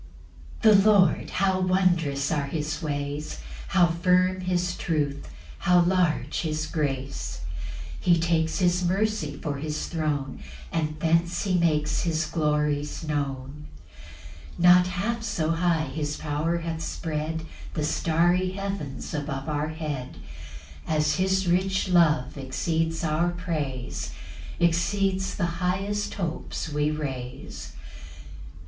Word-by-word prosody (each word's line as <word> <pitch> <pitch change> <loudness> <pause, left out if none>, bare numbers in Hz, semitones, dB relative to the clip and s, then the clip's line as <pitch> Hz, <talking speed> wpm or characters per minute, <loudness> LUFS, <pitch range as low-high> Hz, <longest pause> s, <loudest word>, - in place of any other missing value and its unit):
1. 215 -3 +8
The 215 - +5
Lord, 185 -6 +4
how 190 -1 +1
wondrous 175 -7 +2
are 145 -3 0
his 150 +1 -3
ways: 145 -1 -3 0.3
How 185 -3 +5
firm 180 +2 +2
his 180 -1 0
truth 145 -4 -1 0.3
how 180 -2 +5
large 175 -2 +1
his 155 -1 -1
grace; 135 - -3 0.6
He 175 -1 +4
takes 165 -1 +1
his 180 -1 +2
mercy 190 -5 0
for 145 -3 -3
his 150 +1 -3
throne, 150 -5 -2 0.3
And 155 -1 -1
thence 170 +2 +2
he 190 -3 +1
makes 155 -3 +2
his 160 -1 0
glories 150 -1 0
known. 140 0 -3 0.9
2 - - -2
Not 180 0 +7
half 200 +6 -2
so 170 -8 -1
high 165 -1 +2
his 150 +1 -3
power 155 +3 -1
hath 165 -1 -4
spread 160 0 -3 0.3
The 155 - -1
starry 175 +4 +2
heavens 195 -9 -4
above 145 -2 -3
our 150 0 -1
head, 150 -5 -5 0.7
As 155 -1 +2
his 190 0 +1
rich 190 +2 +1
love 155 -6 +3
exceeds 160 +5 -1
our 160 +2 +2
praise, 155 -8 -3 0.5
Exceeds 190 +3 +1
the 170 -2 -2
highest 195 +3 -1
hopes 170 -2 -3
we 150 0 +1
raise. 135 -5 -5
165 Hz, 120 wpm, -26 LUFS, 150-180 Hz, 0.9 s, 1